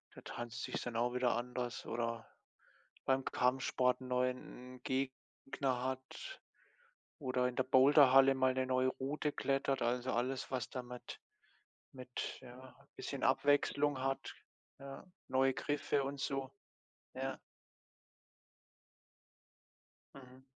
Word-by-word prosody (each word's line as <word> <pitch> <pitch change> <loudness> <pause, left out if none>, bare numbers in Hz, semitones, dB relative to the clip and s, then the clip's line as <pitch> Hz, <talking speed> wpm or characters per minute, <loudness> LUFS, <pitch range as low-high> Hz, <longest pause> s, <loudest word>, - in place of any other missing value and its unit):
da - - -10
tanzt 120 0 -6
sich - - -4
es - - -2
dann 120 -2 -5
auch 120 +1 +1
wieder 125 -2 +2
anders. 125 0 -3
Oder 115 0 -2 0.8
beim 135 0 +2
Kampfsport 125 0 +2
neuen 125 0 -2
'n - - -39
Gegner 130 0 -2
hat 130 - -5 0.8
oder 130 -2 +1
in 125 - -4
der 130 - +2
Boulderhalle 135 0 +7
mal 130 0 +3
'ne 130 0 0
neue 130 0 +3
Route 145 +3 -2
klettert. 135 -1 0
Also, 125 +2 0
alles, 125 +2 -1
was 125 -4 -2
damit 125 -1 -7 0.7
mit 125 -1 -5
ja, 130 0 -12 0.2
bisschen - - -5
Abwechslung 145 -1 +3
hat, 135 -2 -2 0.5
ja, 140 +6 -9 0.2
neue 130 0 +3
Griffe 145 0 0
und 140 +1 -4
so, 135 -1 -2 0.6
ja. 135 +1 -3 2.8
Mhm. 130 -1 -14
130 Hz, 115 wpm, -36 LUFS, 125-135 Hz, 2.8 s, Boulderhalle